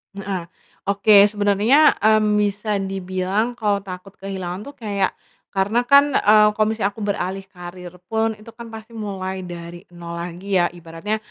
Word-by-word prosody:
Heeh, 195 -3 -4 0.4
oke 200 +1 +5
sebenernya, 210 +8 +4
mmm, 215 -1 +3
bisa 205 0 0
dibilang 190 +3 -2
kalo 205 -3 0
takut 185 0 -9
kehilangan 190 -1 -5
tuh - - -30
kayak 200 -2 0 0.4
karena 200 +4 +1
kan, 280 0 +6
eee, 210 +1 +6
kalo 215 +1 +2
misalnya 220 -2 -1
aku 220 - -10
beralih 195 -1 -2
karier 180 -1 -10
pun 225 0 +1
itu 215 +2 -13
kan 235 0 -10
pasti 220 +1 -10
mulai 190 -3 -4
dari 175 0 -8
nol 170 -1 -8
lagi 175 +3 -6
ya. 175 - +2
Ibaratnya, 170 +5 -4
200 Hz, 155 wpm, -21 LUFS, 185-215 Hz, 0.4 s, kan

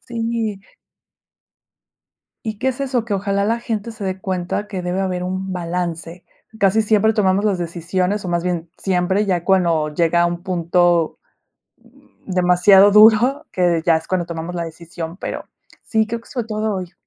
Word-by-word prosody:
Sí. 230 -3 -3 1.8
Y, 215 -2 -5
¿qué 260 - -1
es 260 +1 -5
eso?, 255 -4 -1
que 220 - -2
ojalá 200 0 0
la 230 +2 0
gente 230 -1 -4
se 220 -2 -9
dé 190 -1 -3
cuenta 190 +2 -3
que 195 -3 -5
debe 180 +2 -1
haber 180 -2 -2
un 190 +1 -3
balance. 170 -1 -4 0.4
Casi 200 +2 +3
siempre 215 0 +3
tomamos 195 -2 +2
las 200 -3 +1
decisiones, 180 +4 -2
o, 180 - -4
más 170 0 0
bien 175 -2 -2
siempre, 190 +2 0
ya 180 -4 0
cuando 170 -5 +2
llega 170 +2 +2
a - - +4
un 175 0 -5
punto 175 -2 +1 1.1
demasiado 185 +2 +5
duro, 225 +8 +5
que 185 - -2
de 170 -2 +2
ya 165 -2 +4
es 160 - -5
cuando 180 -2 -1
tomamos 170 +1 -5
la 170 -1 -2
decisión, 165 +1 -8
pero, - - -5 0.4
sí, 220 -2 0
creo 230 +1 -4
que - - -20
fue 245 -3 -3
todo 215 -1 -2
hoy. 180 -1 -6
185 Hz, 170 wpm, -20 LUFS, 175-210 Hz, 1.8 s, demasiado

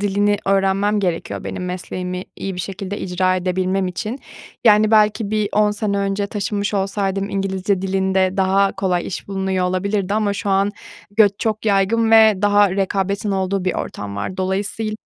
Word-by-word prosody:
dilini 205 +1 +1
öğrenmem 195 +1 +2
gerekiyor 175 -4 -3
benim 180 - -5
mesleğimi 180 0 -5
iyi 195 -1 -4
bir 180 - -4
şekilde 195 +2 -5
icra 185 0 0
edebilmem 185 +1 0
için. 210 +8 -4 0.5
Yani, 215 -1 +5
belki 215 -1 +3
bir 215 -1 0
10 210 0 +3
sene 205 -1 -1
önce 200 0 -1
taşınmış 205 0 -2
olsaydım 195 0 -1
İngilizce 195 0 -1
dilinde 190 0 +1
daha 195 +1 +2
kolay 185 -2 -1
iş 195 - -6
bulunuyor 190 -1 -1
olabilirdi 195 +2 -1
ama 210 -1 +1
şu 200 0 -3
an 195 +1 +2 0.5
göç 205 -3 +6
çok 220 0 -2
yaygın 210 +3 +2
ve 220 -1 +7
daha 205 -1 +4
rekabetin 195 +1 -1
olduğu 190 0 -1
bir 185 - 0
ortam 100 0 -5
var. 145 - -4
Dolayısıyla 200 +3 -2
195 Hz, 160 wpm, -20 LUFS, 190-205 Hz, 0.5 s, ve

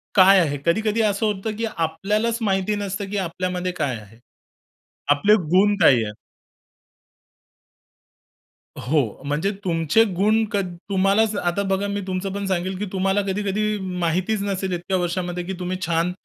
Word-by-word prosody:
काय 195 0 +7
आहे? 145 -5 +1
कधी-कधी 215 +5 +1
असं 210 0 +1
होतं, 210 +1 -2
की 230 - -1
आपल्यालाच 205 +8 0
माहिती 195 0 0
नसतं, 200 -1 -4
की 205 - -3
आपल्यामध्ये 180 +1 -3
काय 140 -5 0
आहे. 105 +2 -16 0.9
आपले 205 +9 +5 0.2
गुण 205 +2 +5
काय 125 -4 +6
आहेत? 105 -1 -5 2.6
हो, 150 +4 +1 0.2
म्हणजे 150 +7 0
तुमचे 165 +4 +3
गुण 215 +4 +3
कध 195 -4 -1 0.2
तुम्हालाच 200 +3 +2
आता 175 +2 0
बघा, 195 +1 0
मी 200 0 -2
तुमचं 185 +1 -2
पण 200 0 -3
सांगेल, 190 0 -1
की 210 - -3
तुम्हाला 195 +1 +1
कधी-कधी 210 +2 -1
म 185 -1 -5
माहितीच 185 +5 0
नसेल 190 -2 -2
इतक्या 180 +2 -1
वर्षामध्ये, 175 0 -2
की 190 - -5
तुम्ही 180 0 -3
छान 170 +1 +1
190 Hz, 150 wpm, -22 LUFS, 175-205 Hz, 2.6 s, काय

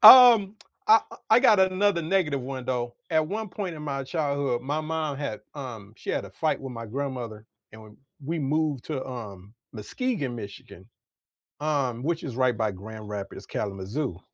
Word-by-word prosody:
Um, 230 -6 +10 0.3
I 220 +1 +8
I - - -10
I 225 +3 +7
got 220 -6 +6
another 190 0 +3
negative 160 -5 +1
one, 130 0 -5
though. 120 -1 -2 0.2
At 155 -1 +3
one 215 +3 -3
point 185 -3 -4
in 150 - -8
my 140 -2 -3
childhood, 140 -5 0
my 145 +4 -1
mom 155 -2 -2
had 135 -8 -4 0.2
um, 115 -7 -7
she - - -13
had - - -1
a - - -10
fight - - 0
with 135 -2 -6
my 115 -1 -6
grandmother, 120 -4 -4 0.3
and 110 0 -11
we 110 - -13 0.4
we 165 +3 -1
moved 150 -2 0
to, 145 -4 -3
um, 105 -6 -8 0.2
Muskegon, 140 - -2
Michigan, 100 -3 -9 0.7
um, 135 -6 0
which 165 +2 -1
is 130 -5 -5
right 130 -2 +3
by 110 -1 0
Grand 105 +3 -9
Rapids, 100 -1 -6
Kalamazoo. 100 - -3
135 Hz, 175 wpm, -27 LUFS, 115-160 Hz, 0.7 s, Um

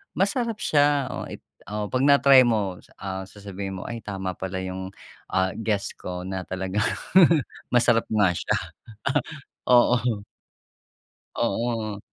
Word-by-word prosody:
Masarap 215 +3 0
siya, 145 -5 +3
oh - - -5
i - - -8 0.3
oo, 105 -1 -2
'pag 130 +4 0
na-try 140 -2 +7
mo, 105 -6 0
s - - -22
ah, 95 -1 -4
sasabihin 100 -1 -7
mo, - - -6
"Ay 115 -2 -6
tama 95 -2 -4
pala 95 0 -4
yung, 95 0 -5 0.4
ah, 95 0 +1
guess 105 -3 -1
ko 90 0 -6
na 95 -1 -3
talagang 95 +3 -2 0.9
masarap 120 -2 +4
nga 105 -3 +4
siya." - - 0 1.1
Oo. 120 -3 +4 1.1
Oo. 110 -1 -1
105 Hz, 130 wpm, -25 LUFS, 95-125 Hz, 1.1 s, na-try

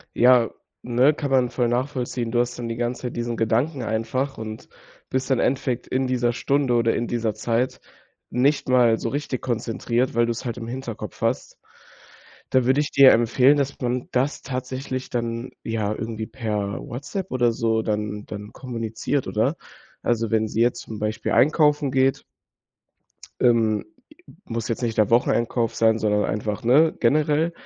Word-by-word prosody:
Ja, 125 -1 +5 0.3
ne, 125 +5 +3
kann 145 -1 -4
man 125 -2 +3
voll 120 -1 0
nachvollziehen. 125 -2 -2
Du 120 - +1
hast 120 0 -1
dann 120 -1 -4
die 115 - -3
ganze 120 +2 -3
Zeit 125 - -4
diesen 120 -1 -3
Gedanken 120 +5 0
einfach 115 +5 -2
und 110 0 -7 0.4
bist 130 0 -2
im 130 - +3
Endeffekt 130 -2 0
in 130 0 0
dieser 120 -2 +1
Stunde 135 0 +1
oder 115 -1 +2
in 120 - -1
dieser 115 -3 -1
Zeit 120 +2 -1 0.5
nicht 135 +4 +1
mal 120 -3 +4
so 115 - -3
richtig 140 -1 -3
konzentriert, 120 +1 -1
weil 120 0 +4
du's 120 +2 -3
halt 120 -2 -3
im 115 -1 -6
Hinterkopf 120 -2 -6
hast. - - -1 0.9
Da 130 -2 +3
würde 130 +3 +3
ich 150 - -3
dir 140 -1 +8
empfehlen, 125 +5 +4
dass 140 -1 -2
man 125 0 -2
das 135 +3 0
tatsächlich 130 0 -4
dann, 115 0 -3
ja, 110 -2 -1
irgendwie 110 0 -5
per 105 -5 -3
WhatsApp 145 +9 -6
oder 120 -2 +2
so 115 -1 0
dann 105 -1 -3
dann 105 0 -8
kommuniziert, 115 +2 -3
oder? - - +1 0.5
Also, 115 -2 0
wenn 110 0 +2
sie 110 +2 -1
jetzt 120 0 +2
zum 110 - -8
Beispiel 110 +1 -2
einkaufen 150 -1 +3
geht 135 0 +2 1.2
ähm, 115 -3 +3 0.4
i - - -13
muss 115 -1 -4
jetzt 115 - -3
nicht 115 -2 -1
der 105 - +3
Wocheneinkauf 115 0 +2
sein, 110 0 +3
sondern 105 -1 +1
einfach, 105 0 -2
ne, 150 +7 +5
generell. 150 +5 +2
120 Hz, 165 wpm, -23 LUFS, 115-130 Hz, 1.2 s, dir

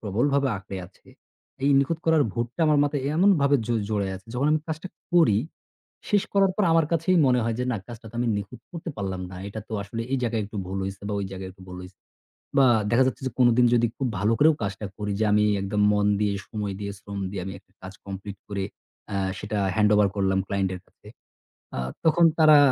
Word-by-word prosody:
প্রবলভাবে 135 +7 +1
আঁকড়ে 95 0 -7
আছে, 95 - -26 0.6
এই 140 - +3
নিখুঁত 150 +4 +1
করার 160 -2 +5
ভূতটা 120 +6 -4
আমার 150 -1 +4
মাথায় 145 -1 -1
এমনভাবে 160 -7 +4
জ - - -10 0.2
জড়িয়ে 100 -3 0
আছে, 95 - -16
যখন 135 +4 +1
আমি 155 - +2
কাজটা 160 +3 -5 0.2
করি, 160 - +5 0.7
শেষ 205 -2 +4
করার 195 -1 +4
পর 210 - +2
আমার 165 -1 +4
কাছেই 170 +3 +2
মনে 125 -1 +3
হয় 115 0 0
যে 125 - 0
না, - - -1
কাজটা 120 -1 -10
তো - - -22
আমি 120 - +1
নিখুঁত 100 +4 -6
করতে 170 0 -6
পারলাম 95 -2 -3
না। 90 - -9
এটা 110 +2 -6
তো - - -9
আসলে 110 +4 -6
এই 135 - +2
জায়গায় 115 -2 0
একটু 105 +1 -9
ভুল 95 +1 -4
হয়েছে, 95 0 -6
বা - - -2
ওই 100 - -3
জায়গায় 95 0 -6
একটু 95 0 -17
ভুল 90 - -8
হয়েছে, 90 0 -13 0.6
বা 135 - +7 0.3
দেখা 120 +3 +5
যাচ্ছে 130 - -3
যে 130 - -4
কোনোদিন 120 0 +5
যদি 120 -1 +4
খুব 135 - -1
ভালো 105 +3 +2
করেও 155 +2 +6
কাজটা 100 +1 -4
করি 105 -1 -3
যে, 110 - +2
আমি 105 0 +4 0.2
একদম 105 +1 -1
মন 105 0 +2
দিয়ে, 105 -1 +1 0.2
সময় 105 -3 -3
দিয়ে, 100 -1 -4
শ্রম 100 0 -7
দিয়ে, 95 -1 -4
আমি 95 - -5
একটা - - -37
কাজ 95 +1 -9
complete 100 0 -7
করে 100 -1 -2 0.5
অ্যা 100 - -1 0.2
সেটা 105 +1 -3 0.2
handover 105 -1 +4
করলাম 95 -1 +1
client 100 -1 0
এর - - -8
কাছে। - - -21 0.7
আ - - -1 0.3
তখন 170 +1 +5
তারা 155 -1 +8
110 Hz, 215 wpm, -25 LUFS, 100-140 Hz, 0.7 s, তারা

